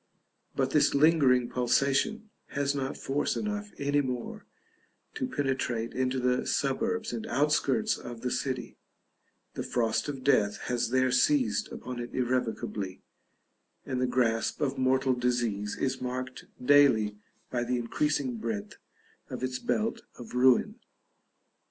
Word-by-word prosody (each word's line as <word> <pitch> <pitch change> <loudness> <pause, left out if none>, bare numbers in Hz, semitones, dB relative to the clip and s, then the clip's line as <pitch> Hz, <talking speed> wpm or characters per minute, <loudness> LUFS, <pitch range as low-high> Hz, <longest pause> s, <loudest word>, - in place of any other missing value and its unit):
But - - 0
this - - +3
lingering 140 -5 +4
pulsation 140 - +1 0.2
has 140 0 -1
not 135 -1 -3
force 140 +2 -1
enough 210 -1 -3
any 145 +1 +1
more 125 -3 -5 0.7
to 130 - -2
penetrate 130 -4 -1
into 130 0 0
the 125 0 +1
suburbs 225 - 0
and 225 0 -4
outskirts 150 - +1
of 120 -1 -8
the 125 - -2
city; 130 -2 -3 0.7
the - - -4
frost 115 +3 0
of 135 -3 -5
death 105 -7 +3
has 120 -2 -1
there 130 +1 +2
seized 125 -4 +2
upon 125 -1 -6
it 120 0 -6
irrevocably, 120 -6 -2 0.8
and 130 -2 -2
the 125 - +2
grasp 115 -3 +1
of 140 -3 0
mortal 130 0 +2
disease 120 -5 -1
is 130 -1 -1
marked 130 0 -4
daily 125 -7 +4 0.3
by 120 -1 0
the 125 +1 0
increasing 130 +1 -1
breadth 110 -2 -4 0.5
of - - -6
its 130 0 -2
belt 220 - -1 0.2
of 120 - -10
ruin. 130 - +3
130 Hz, 135 wpm, -29 LUFS, 120-140 Hz, 0.8 s, lingering